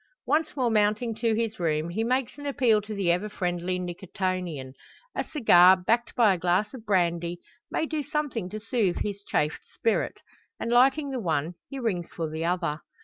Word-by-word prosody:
Once 310 +1 +1
more 250 -4 +1
mounting 215 +2 +2
to 225 0 0
his 225 -2 -2
room, 160 -1 0
he 210 +6 -1
makes 255 +1 0
an 285 - -5
appeal 240 -6 +3
to 210 +1 -7
the 190 -4 +2
ever 180 +5 0
friendly 180 -2 -2
Nicotian. 180 -5 -4 0.4
A - - -1
cigar, 190 - +6
backed 230 +6 0
by 220 -5 +5
a 180 - -3
glass 180 +6 +1
of 230 -4 -10
brandy, 175 -3 +1 0.3
may - - 0
do 310 -1 -2
something 290 -9 -2
to 215 - -5
soothe 220 -4 0
his 200 -1 -4
chafed 150 -5 -1
spirit; 225 - 0 0.4
and 230 - -2
lighting 275 +4 +4
the 260 - -2
one, 160 -4 -1 0.2
he 275 - -6
rings 200 -9 -2
for 165 -2 -3
the 160 +1 -4
other. 170 -3 -1
205 Hz, 185 wpm, -27 LUFS, 175-235 Hz, 0.4 s, cigar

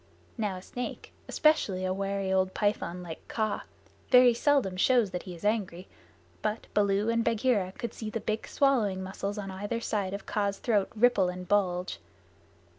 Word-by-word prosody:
Now 210 -5 -1
a 185 - -10
snake, 245 +4 -6
especially 205 -12 +2
a 185 - 0
wary 195 0 -1
old 190 0 +1
python 195 -4 -1
like 165 -2 -9
Kaa, 215 -2 -2 0.4
very 250 -1 +7
seldom 240 -6 +2
shows 230 +1 +3
that 180 -1 -3
he 180 - -6
is 170 - -10
angry, 195 -4 -1 0.5
but 215 +2 -2
Baloo 205 +1 +2
and 230 0 +2
Bagheera 225 -5 +1
could 235 +2 -5
see 220 - -5
the 225 - -3
big 215 0 -3
swallowing 220 -9 +2
muscles 195 +2 -4
on 195 -2 -5
either 205 +5 -3
side 200 -4 -2
of 200 - -8
Kaa's 200 -1 -1
throat 210 -4 +1
ripple 215 -5 +4
and 180 0 -6
bulge. 185 -2 0
205 Hz, 170 wpm, -29 LUFS, 190-230 Hz, 0.5 s, very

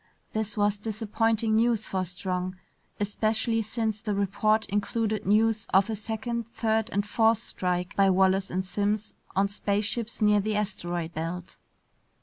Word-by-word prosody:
This 220 -1 -1
was 205 0 +2
disappointing 220 +1 0
news 230 -1 +2
for 190 -1 -1
Strong, 180 +1 -3 0.4
especially 220 +2 +1
since 220 -1 -2
the 210 -3 -2
report 205 +2 +2
included 210 +1 -1
news 220 +1 +3
of 195 +3 +4
a - - -1
second, 225 +2 -3
third, 220 0 +1
and 205 -2 0
fourth 225 +1 +3
strike 180 -4 -2
by 195 -1 +5
Wallace 190 +1 +3
and 185 +1 -2
Simms 205 +2 -1 0.2
on 195 +1 +3
spaceships 205 +3 -1
near 210 -1 +4
the 215 +1 -1
asteroid 175 -5 -2
belt. 165 +3 -5
210 Hz, 140 wpm, -27 LUFS, 195-220 Hz, 0.4 s, by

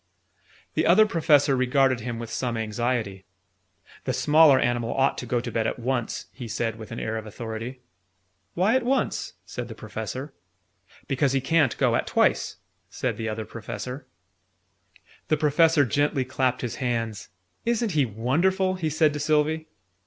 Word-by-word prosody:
The - - +1
Other 205 +6 +7
Professor 150 -7 +3
regarded 130 0 +2
him 120 +1 -4
with 115 -1 -6
some 120 -3 -2
anxiety. 110 -3 -2 0.8
"The - - 0
smaller 150 -2 +6
animal 120 -2 0
ought 135 +1 +2
to 125 - -6
go 120 +1 +1
to 120 0 -5
bed 110 -1 0
at - - -2
once," 125 -1 -2
he 125 -2 -7
said 115 0 -2
with 110 - -9
an 115 - -5
air 110 0 -2
of 110 -1 -6
authority. 115 +3 -6 0.7
"Why 195 +7 +3
at 260 - +3
once?" 255 0 -1
said 120 +6 -6
the 115 - -9
Professor. 110 +6 -6 0.7
"Because 135 0 +1
he 135 - +3
can't 145 -1 +2
go - - +2
at - - -1
twice," - - +2 0.3
said - - -2
the 115 -1 -3
Other 110 0 -4
Professor. 125 +5 -7 1.2
The 155 - +2
Professor 150 0 +4
gently 140 +2 +1
clapped 130 -1 0
his 120 -3 -4
hands. 115 -5 -2 0.3
"Isn't 235 -2 0
he 150 -4 +3
wonderful!" 170 - +1
he 170 -4 -2
said 155 0 +2
to 150 - -4
Sylvie. 155 +1 +1
130 Hz, 160 wpm, -25 LUFS, 115-155 Hz, 1.2 s, Other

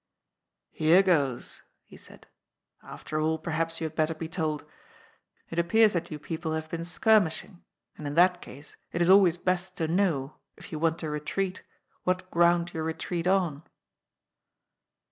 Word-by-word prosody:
" - - -59 0.3
Here 165 +5 +4
goes," 145 -10 0 0.2
he - - -16
said. - - -14 0.3
" - - -50
After 155 - -6
all, 160 +1 +1
per 160 +2 -6
haps 165 +1 -1
you 160 - -2
had 160 - -5
better 160 0 +1
be 160 +1 -5
told. 155 -3 -3 0.9
It 165 - -1
appears 215 +5 +4
that 170 -1 -2
you 155 - -5
people 160 +1 -4
have 160 0 -4
been 170 0 -3
skirmishing, 185 -1 +1 0.4
and 150 - -5
in 145 - -4
that 180 +1 +4
case 145 +3 -11 0.2
it 170 - -3
is 175 +1 +4
always 190 -3 +6
best 185 +1 -2
to 160 - -1
know, 160 -6 0 0.2
if - - -13
you 155 - -4
want 165 0 +1
to 160 - -3
retreat, 180 +5 -3 0.4
what 185 0 -2
ground 170 0 +3
you 160 - -3
retreat 165 +2 -3
on." 180 -6 +1
165 Hz, 170 wpm, -28 LUFS, 155-180 Hz, 0.9 s, always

